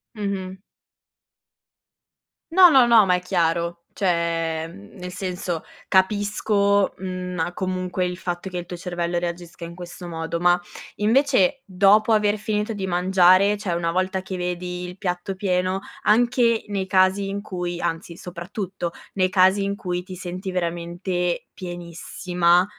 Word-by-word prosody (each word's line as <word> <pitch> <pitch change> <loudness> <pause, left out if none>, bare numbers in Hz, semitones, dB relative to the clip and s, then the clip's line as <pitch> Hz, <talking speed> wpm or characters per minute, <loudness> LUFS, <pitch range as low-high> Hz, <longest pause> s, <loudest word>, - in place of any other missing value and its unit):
Mh-mh. 195 -2 -3 2.0
No 365 +1 +8
no 265 -5 +6
no, 230 -3 +6
ma 180 - +4
è 180 - -2
chiaro, 170 -1 0
cioè, 165 -3 0
mhmm, 100 +1 -14
nel 180 0 -6
senso 180 -2 -4 0.2
capisco, 200 +1 +2
mhmm 185 -1 -4
ah, 175 +2 -1
comunque 185 0 -2
il 180 0 -3
fatto 175 +1 -4
che 180 - -3
il 175 - -7
tuo 175 - -6
cervello 175 -1 -2
reagisca 175 0 -5
in 170 - -8
questo 175 0 -9
modo. 165 0 -3
Ma 175 +1 +4 0.4
invece, 255 +1 +3
dopo 200 +3 +4
aver 210 -1 +3
finito 210 +1 -2
di 200 -2 -3
mangiare, 185 +2 +4
cioè 200 -4 -3
una 170 -1 0
volta 185 +1 0
che 190 0 -6
vedi 180 0 -3
il 180 +1 -7
piatto 180 0 -2
pieno, 185 -1 0 0.2
anche 235 +1 +3
nei 200 -2 -2
casi 190 +1 +3
in 200 +1 -3
cui 180 -3 -4
anzi 165 +1 -3
soprattutto 180 +1 -5 0.2
nei 185 -1 +2
casi 190 +1 +4
in 200 0 -1
cui 180 -2 -3
ti 185 0 -9
senti 185 +2 -5
veramente 175 0 -2
pienissima, 175 0 0
185 Hz, 145 wpm, -23 LUFS, 175-200 Hz, 2.0 s, No